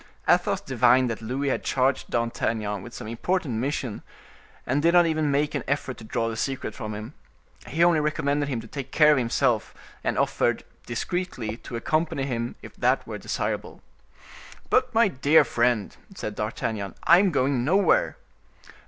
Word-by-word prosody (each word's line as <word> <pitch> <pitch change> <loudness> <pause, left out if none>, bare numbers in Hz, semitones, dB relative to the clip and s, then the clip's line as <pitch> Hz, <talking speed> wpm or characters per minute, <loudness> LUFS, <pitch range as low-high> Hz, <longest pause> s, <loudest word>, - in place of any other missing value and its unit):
Athos - - +3
divined 125 0 +3
that 115 - -5
Louis 130 +5 -2
had - - -1
charged 130 +1 0
D'Artagnan 110 -3 -1
with 120 - -10
some 110 - -8
important 125 +1 -1
mission, 130 -3 -3 0.6
and 135 +4 +1
did 170 +2 +3
not 175 -1 +7
even 155 -2 +1
make 145 +1 +1
an - - -2
effort 135 -3 -2
to - - -11
draw 115 +1 -2
the 115 - -3
secret 135 +4 -3
from 110 -3 -6
him. 110 +6 -7 0.5
He 165 +5 +1
only 170 -2 +5
recommended 145 -1 0
him 125 -4 -2
to 115 - -12
take 135 +1 -7
care 150 0 +6
of 145 - +4
himself, 115 -2 0 0.3
and - - -1
offered - - +1 0.2
discreetly 120 -3 -3
to 120 - -9
accompany 155 +3 0
him 120 -3 -3
if - - -11
that - - +2
were - - -6
desirable. - - -4 0.9
"But, 255 0 +3
my 230 -1 +4
dear 145 -1 +4
friend," 120 -4 0 0.2
said 105 - -5
D'Artagnan, 105 -2 -3
"I 170 +2 +7
am 200 0 +3
going 135 -5 +1
nowhere." 200 - +2
130 Hz, 170 wpm, -25 LUFS, 115-155 Hz, 0.9 s, not